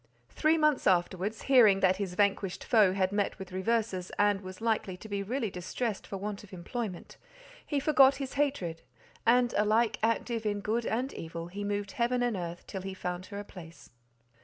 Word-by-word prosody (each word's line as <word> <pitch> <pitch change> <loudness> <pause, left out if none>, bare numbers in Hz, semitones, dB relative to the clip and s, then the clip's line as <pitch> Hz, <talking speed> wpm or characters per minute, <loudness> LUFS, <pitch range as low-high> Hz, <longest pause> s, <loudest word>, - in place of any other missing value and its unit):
Three 315 +1 +2
months 305 -3 +2
afterwards, 185 +3 +1
hearing 230 -8 +6
that 185 0 +4
his 190 -3 -4
vanquished 195 -1 +1
foe 210 -6 +4
had 190 -1 +1
met 205 -1 -1
with 190 -1 -9
reverses, 190 -1 -1
and 205 -1 +3
was 185 -1 -9
likely 220 -5 -1
to 220 - -11
be 200 -1 -2
really 225 +1 -2
distressed 195 +5 -4
for 195 - -5
want 205 +1 -5
of 210 - -15
employment, 190 +1 -6 0.5
he 290 - -1
forgot 275 -2 +5
his 270 -1 -5
hatred, 265 - -1 0.5
and 245 0 +4
alike 215 +2 +2
active 230 +1 0
in 205 -1 -1
good 225 +3 -1
and 250 +5 -1
evil, 165 +1 -6
he 200 +3 -5
moved 205 -1 -2
heaven 245 +2 0
and 240 -3 0
earth 175 -1 -5
till 190 - -6
he 190 0 -6
found 180 0 -4
her 200 - -7
a 205 - -4
place. 170 -4 -13
205 Hz, 185 wpm, -30 LUFS, 185-235 Hz, 0.5 s, hearing